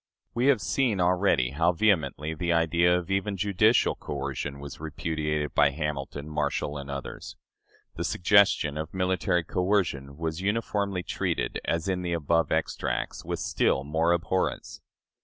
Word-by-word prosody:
" - - -52
We 120 +3 +1
have 135 -7 +4
seen 115 +2 +1
already 90 -8 +2
how 85 +5 +2
vehemently 80 -6 +1
the 85 +2 -2
idea 85 +1 +3
of 90 +2 -5
even 100 +1 0
judicial 105 +4 +3
coercion 70 0 -5
was 70 -1 -9
repudiated 75 -1 -2
by 75 -1 +5
Hamilton, 70 -1 -4
Marshall, 75 -1 -2
and 70 0 -8
others. 70 -1 -6 0.6
The - - -2
suggestion 90 -6 +3
of 80 +3 -6
military 90 -1 +1
coercion 90 -7 -1
was 80 +1 -3
uniformly 100 -2 -1
treated, - - -2
as 85 +1 -1
in 95 -1 0
the 90 -1 -2
above 85 0 +1
extracts, - - -2
with - - -3
still 65 - +1
more 80 +4 +1
abhorrence. 90 +2 -1
85 Hz, 145 wpm, -27 LUFS, 75-95 Hz, 0.6 s, by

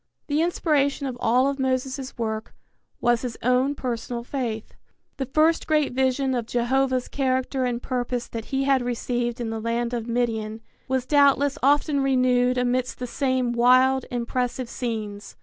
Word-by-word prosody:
The 295 +1 0
inspiration 295 -5 +1
of 260 -2 -3
all 250 +4 +3
of 280 0 -2
Moses' 265 0 -2
work 220 -1 -4 0.4
was 240 -1 +2
his 245 -3 -5
own 255 +4 +2
personal 240 -2 -4
faith. 235 -4 -4 0.4
The 270 - -3
first 310 +4 +2
great 300 -4 +2
vision 265 +1 +1
of 240 -3 -2
Jehovah's 255 +1 +1
character 260 -1 0
and 240 -1 -1
purpose 245 -1 -2
that 225 -1 -6
he 270 0 -1
had 270 -1 +3
received 240 0 -2
in 230 -2 -3
the 225 -1 -4
land 235 +1 -1
of 235 -1 -3
Midian 225 -2 -1 0.3
was 260 -1 0
doubtless 285 0 +3
often 285 +1 +3
renewed 255 -2 +2
amidst 250 0 0
the 250 - -4
same 255 -1 0
wild, 255 +2 +4
impressive 245 +1 -2
scenes. 215 -4 -5
255 Hz, 155 wpm, -24 LUFS, 240-270 Hz, 0.4 s, wild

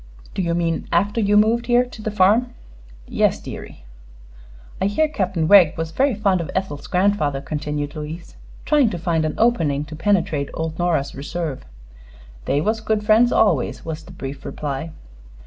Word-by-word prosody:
"Do - - -2
you 170 -2 0
mean 170 -1 -1
after 200 +6 +1
you 205 0 +3
moved 225 +3 +3
here, 245 0 +4
to 245 -3 -11
the 215 - -2
farm?" 215 +5 +2 0.5
"Yes, - - +1
deary." - - -9 1.0
"I 190 - +3
hear 310 +10 +2
Captain 185 - -1
Wegg 180 -5 +6
was 160 0 -3
very 270 +4 +1
fond 195 -4 +1
of 160 - -6
Ethel's 170 -7 -3
grandfather," 180 -7 +1
continued 150 0 -4
Louise, 155 +3 -7 0.3
trying 290 -6 +3
to 180 - -4
find 165 -2 0
an 155 - -2
opening 160 -12 +1
to 155 +1 -9
penetrate 165 -5 0
old 160 0 -4
Nora's 160 -5 0
reserve. 145 0 -5 0.8
"They 145 - +1
was 220 +5 -1
good 220 -1 -1
friends 225 +3 +5
always," 175 - +1
was 160 -1 -5
the - - -14
brief 135 +1 -7
reply. 145 +2 -4
175 Hz, 165 wpm, -21 LUFS, 155-210 Hz, 1.0 s, Wegg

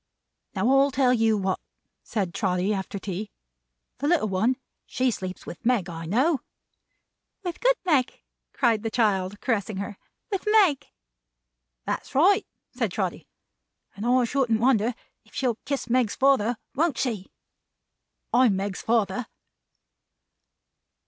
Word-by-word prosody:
"Now, - - +1
I'll 275 +1 +5
tell 260 -2 +3
you 225 -2 +3
what," 190 -1 -1 0.4
said 195 -6 -3
Trotty 185 0 0
after 195 0 -4
tea. 195 +2 -5 0.7
"The 285 - -1
little 305 -10 +2
one, 220 +7 +1 0.3
she 255 0 +1
sleeps 185 -4 -6
with 175 - -9
Meg, 230 -7 +1
I 165 0 -6
know." 265 - +2 1.0
"With 355 -2 -4
good - - +4
Meg!" 280 -8 +1 0.3
cried 230 -5 +2
the 225 - -2
child, 205 -4 +1
caressing 215 -4 -1
her. 200 +1 -5 0.3
"With 390 +1 -2
Meg." 400 -10 +4 1.0
"That's - - -4
right," 365 +8 +4 0.3
said - - -1
Trotty. - - -3 0.7
"And 200 - -6
I 250 +2 +3
shouldn't 240 -2 +1
wonder 235 -1 +2 0.3
if - - -21
she'll 245 -4 0
kiss 275 -3 -2
Meg's 245 -3 +1
father, 260 -4 +3 0.2
won't 310 -2 +1
she? 220 -7 -2 1.0
I'm 240 -4 +5
Meg's 195 0 -3
father." 220 0 0
230 Hz, 130 wpm, -26 LUFS, 200-265 Hz, 1.0 s, I'll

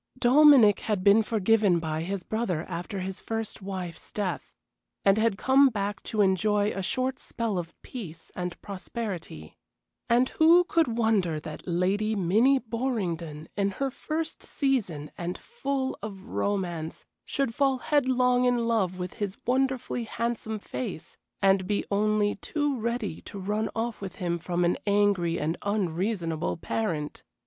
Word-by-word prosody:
Dominic 255 -4 +7
had 205 -4 -1
been 200 +3 +6
forgiven 215 -3 +3
by 160 -1 -2
his 190 +2 -3
brother 205 -8 -1
after 185 +3 -5
his 190 0 -5
first 225 -1 -4
wife's 185 -3 -6
death, 200 -3 -3 0.5
and 195 +2 +5
had 220 -3 +2
come 270 +4 +5
back 205 -2 -3
to 215 - -1
enjoy 205 +2 +2
a 195 - -3
short 255 +7 -1
spell 225 -5 -2
of 170 -1 -8
peace 170 -10 -8
and 180 -1 -4
prosperity. 190 - -6 0.5
And 245 +2 +4
who 335 +3 +6
could 320 -9 +1
wonder 200 -9 +2
that 155 +2 -8
Lady 195 +5 +1
Minnie 215 +9 +4
Borringdon, 190 - -3
in 200 -1 +1
her 270 +5 -2
first 315 +4 -4
season, 205 - -1
and 175 +1 -3
full 275 - -3
of 200 -2 -7
romance, 175 -6 -2 0.2
should 275 -4 -1
fall 270 +1 +2
headlong 250 -3 +2
in 245 -2 +2
love 195 -6 +1
with 180 0 -4
his 200 -1 -2
wonderfully 255 -1 0
handsome 225 -1 -3
face, 205 -4 -6 0.3
and 195 -1 +4
be 205 0 0
only 210 0 +2
too 290 +5 -1
ready 230 -5 -2
to - - -9
run 210 +3 -1
off 230 -1 -2
with 195 -2 -6
him 170 -1 -2
from 175 +1 0
an 175 - +1
angry 200 -4 +2
and 160 +3 -1
unreasonable 180 -4 -1
parent! 165 -6 -3
205 Hz, 145 wpm, -27 LUFS, 180-235 Hz, 0.5 s, Dominic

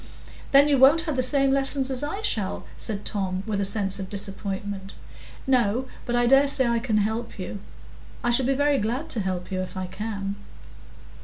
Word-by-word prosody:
"Then 280 +1 +7
you 285 -3 +3
won't 280 +5 +6
have 315 -4 -3
the 255 - +1
same 275 +1 +3
lessons 270 0 +1
as 260 0 0
I 390 +9 -4
shall?" 205 - -1
said 205 -2 -3
Tom, 190 -2 -2
with 210 -3 -2
a - - 0
sense 195 -1 +2
of 190 -1 -6
disappointment. 200 -1 -5 0.5
"No; 250 -2 +2 0.2
but 240 - 0
I 240 0 +3
dare 270 +3 +5
say 265 -2 +3
I 235 0 +1
can 225 -3 0
help 220 +3 -2
you. 190 +1 -6 0.6
I 240 - +2
shall 245 +1 +4
be 270 - +2
very 285 0 +2
glad 245 +10 -2
to 230 - -1
help 185 -2 -3
you 185 -1 -1
if 185 - -7
I 185 - -3
can." 200 +1 -5
225 Hz, 200 wpm, -25 LUFS, 200-270 Hz, 0.6 s, Then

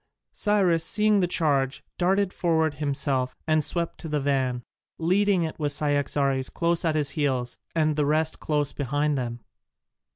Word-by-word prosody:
Cyrus 190 -6 +2
seeing 210 -1 +2
the 180 - +2
charge, 140 -6 +1 0.2
darted 190 +2 +1
forward 160 -3 +1
himself, 140 -3 -1
and 155 -1 +2
swept 170 +2 +1
to 160 - -7
the 150 -1 0
van, 130 -3 -1 0.3
leading 185 +2 +2
it 160 0 -5
with 145 -2 0
Cyaxares 140 -2 0
close 170 0 0
at 160 -2 +1
his 150 -2 0
heels 130 -6 -1 0.2
and 155 -2 +2
the 150 -1 +1
rest 155 +1 +1
close 150 -2 0
behind 145 +2 -1
them. 120 -3 -4
150 Hz, 155 wpm, -25 LUFS, 140-170 Hz, 0.3 s, Cyrus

